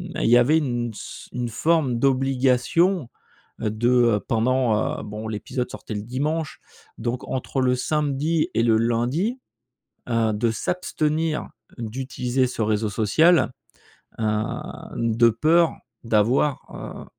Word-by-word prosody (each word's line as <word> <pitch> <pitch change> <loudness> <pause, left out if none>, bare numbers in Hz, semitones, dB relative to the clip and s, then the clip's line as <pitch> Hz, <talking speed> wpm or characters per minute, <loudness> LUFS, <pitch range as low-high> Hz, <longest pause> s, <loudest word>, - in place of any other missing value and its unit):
il - - -1
y 120 - +7
avait 140 +6 +4
une 120 -6 -1
s - - -9
une 120 -1 -2
forme 140 +1 +1
d'obligation, 135 +4 +2 0.5
heu, 110 - 0
de, 115 +3 0
heu, 120 -4 +4
pendant 115 -1 +1
heu - - -7
bon, 105 +1 -6
l'épisode 125 +4 -3
sortait 110 - -7
le 105 - -4
dimanche 145 +6 -2 0.4
donc, 120 +2 -3
entre 130 +1 -2
le 125 -1 +3
samedi 150 +3 0
et 115 - +2
le 115 -2 +4
lundi, 120 - 0 0.7
heu, 115 -2 +2
de 115 +2 +1
s'abstenir 155 +3 -1 0.3
d'utiliser 125 +2 -1
ce 120 -2 -3
réseau 110 0 +1
social, 140 - +3 0.7
heu, - - 0 0.7
de 115 0 +3
peur 160 +8 +3 0.3
d'avoir, 115 +6 +2
heu, - - -8
125 Hz, 130 wpm, -23 LUFS, 115-150 Hz, 0.7 s, y